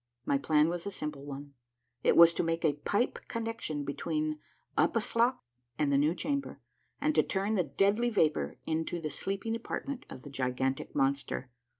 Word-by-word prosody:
My 140 - +2
plan 150 +1 +4
was 175 +2 -2
a - - 0
simple 150 -7 -5
one: 140 0 -7 0.5
it - - +4
was 170 0 +9
to - - 0
make 165 0 0
a 150 - +4
pipe 205 - 0
connection 225 -10 -3
between 155 +2 -2 0.4
Uphaslok 230 +2 +2 0.4
and 145 -2 +2
the - - +5
new 150 +4 +3
chamber, 280 +8 -2 0.4
and 305 +1 +2
to - - +5
turn 200 +2 -1
the 200 - +3
deadly 200 - +2
vapor 155 -9 +1
into 160 +2 -1
the 155 -2 -4
sleeping 195 +4 -2
apartment 255 +3 -5
of 130 - -9
the 145 - -9
gigantic 130 0 -1
monster. 135 -1 0
160 Hz, 170 wpm, -31 LUFS, 145-215 Hz, 0.5 s, was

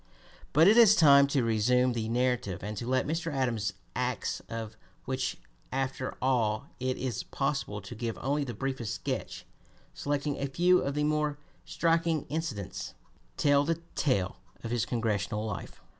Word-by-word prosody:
But 160 +5 +6
it 215 +3 +6
is 220 -3 +8
time 140 -6 +7
to 140 -2 +1
resume 125 +3 +3
the 110 -1 -2
narrative 125 -5 0
and 105 +1 -4
to 120 - -4
let 130 0 +1
Mr. 165 +2 -2
Adams's 120 -7 0 0.2
acts - - -2
of 115 -1 -5 0.3
which 130 0 -2 0.3
after 135 0 -2
all 115 -5 +1
it 130 0 -1
is 125 -3 -2
possible 135 -7 -2
to 100 +4 -9
give 115 0 -4
only 145 +2 0
the 120 -5 -5
briefest 120 -2 -3
sketch, - - -4 0.5
selecting 145 0 -2
a 140 - -1
few 180 +6 +4
of 140 0 -2
the 150 - +1
more 150 -1 +1 0.3
striking 165 -2 +1
incidents 150 - -4 0.4
tell 145 -1 +4
the 165 +2 -1
tale 100 -10 0 0.3
of 115 - -4
his 120 0 0
Congressional 105 -2 -1
life. 110 -3 -6
130 Hz, 160 wpm, -29 LUFS, 115-145 Hz, 0.5 s, is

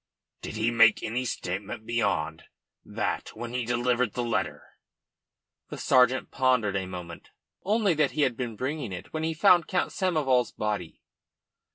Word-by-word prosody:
"Did - - -6
he 110 +2 +1
make 115 - +5
any 125 +3 -2
statement 100 0 -4
beyond 115 -1 -1 0.4
that - - -3
when 120 0 -6
he 125 -1 -1
delivered 120 -1 +1
that 125 - -2
letter?" 120 -1 -2 1.1
The - - -6
sergeant 130 0 +3
pondered 125 -6 +2
a 95 -1 -2
moment. 90 -2 -8 0.3
"Only 210 -1 +2
that 150 -3 +2
he 150 - +1
had 125 -4 +1
been 120 -3 -4
bringing 130 -1 -3
it 90 - -9
when 155 - -2
he 160 0 -1
found 175 -1 +5
Count 180 - 0
Samoval's 140 - +1
body." 105 -6 -4
125 Hz, 155 wpm, -27 LUFS, 110-145 Hz, 1.1 s, make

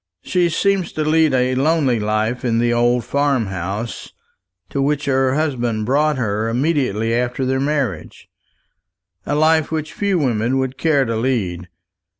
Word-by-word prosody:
She 175 -2 +1
seems 195 +2 0
to 155 - -1
lead 155 0 +3
a 130 0 +1
lonely 135 -3 +1
life 110 +3 -1
in 115 -2 +1
the 120 0 +2
old 120 0 +2
farm 140 -4 +1
house 95 +4 -5 0.6
to 140 - -1
which 145 +1 0
her 135 -1 +1
husband 120 -8 -1
brought 150 +4 +1
her 110 -2 -1
immediately 120 -4 0
after 125 +2 -1
their 130 +1 0
marriage 135 - -3 1.0
a - - 0
life 155 +1 +2
which 155 -1 -3
few 200 -2 0
women 125 -3 0
would 130 0 -2
care 145 -5 +2
to 115 -1 -2
lead. 100 -8 -2
130 Hz, 150 wpm, -19 LUFS, 115-150 Hz, 1.0 s, lead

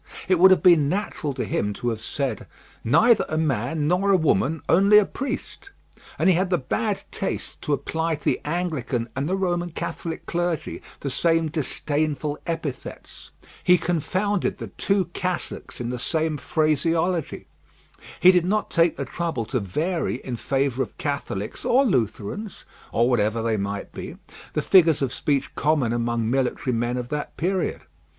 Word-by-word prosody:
It 185 -1 +3
would 190 +2 +8
have 190 - +4
been 165 -6 +6
natural 185 -5 -2
to - - -2
him 105 0 -1
to 120 +4 -2
have 110 -2 -3
said, 135 -1 -3 0.4
"Neither 225 - +5
a 155 - -1
man 145 0 0
nor 180 +4 +2
a 195 - +6
woman, 155 - +1
only 200 +4 +6
a 210 - +6
priest;" 275 - -5 0.5
and - - +2
he 190 - +6
had 180 +2 +1
the 180 - +2
bad 205 - -2
taste 195 - -4
to 150 - -1
apply 160 +3 -1
to 145 - -15
the - - +1
Anglican 145 -8 -2
and 135 +4 -2
the 190 - +1
Roman 175 -2 -1
Catholic 165 0 -5
clergy 175 -1 -2 0.2
the 140 - -3
same 165 +2 +2
disdainful 150 0 -1
epithets. 160 -6 -6 0.3
He 180 0 +6
confounded 180 +4 -1
the - - -7
two 195 -2 0
cassocks 185 -1 -3
in 120 -1 -3
the 125 0 -3
same 160 +3 0
phraseology. 165 +3 0 0.7
He 180 - +8
did 180 -2 +3
not 210 +4 0
take 165 -1 +3
the 140 - -3
trouble 160 -4 -3
to 125 +3 -1
vary 155 - -1
in 125 - -4
favour 135 +1 0
of - - -4
Catholics 140 -8 -3
or 270 +3 +4
Lutherans, 130 - -2 0.3
or 120 +1 +3
whatever 115 -2 +1
they 115 -1 +1
might 100 0 -4
be, - - -7 0.4
the - - -1
figures 165 -6 +5
of 130 - -1
speech 140 -2 -1
common 145 -6 +1
among 120 -1 -1
military 130 0 0
men 120 +2 -1
of 120 -1 -4
that 150 0 -4
period. 185 +2 -1
155 Hz, 165 wpm, -24 LUFS, 125-180 Hz, 0.7 s, would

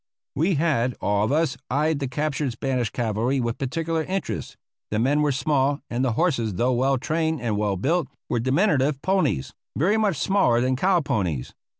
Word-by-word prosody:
We 170 +5 +1
had, 140 -6 +1
all 100 0 +1
of 110 - -1
us, 160 +2 +1
eyed 150 +3 +1
the 135 - -2
captured 145 -1 -2
Spanish 125 -1 -1
cavalry 120 +4 -1
with 120 -2 -2
particular 160 +4 -1
interest. 195 +1 -4 0.3
The 105 - -1
men 135 +6 +2
were 150 -1 +2
small, 140 +1 +1
and 120 +2 0
the 125 -3 +1
horses, 120 - 0
though 125 +7 +1
well 135 +2 +2
trained 160 +3 -1
and 115 -3 -1
well 105 -2 0
built, 155 - 0 0.2
were 120 - 0
diminutive 140 - +1
ponies, 190 - 0 0.2
very 190 +9 +2
much 205 -7 +1
smaller 150 -8 +2
than 130 +1 +1
cow 180 +6 +2
ponies. 95 - -2
135 Hz, 180 wpm, -24 LUFS, 120-160 Hz, 0.3 s, men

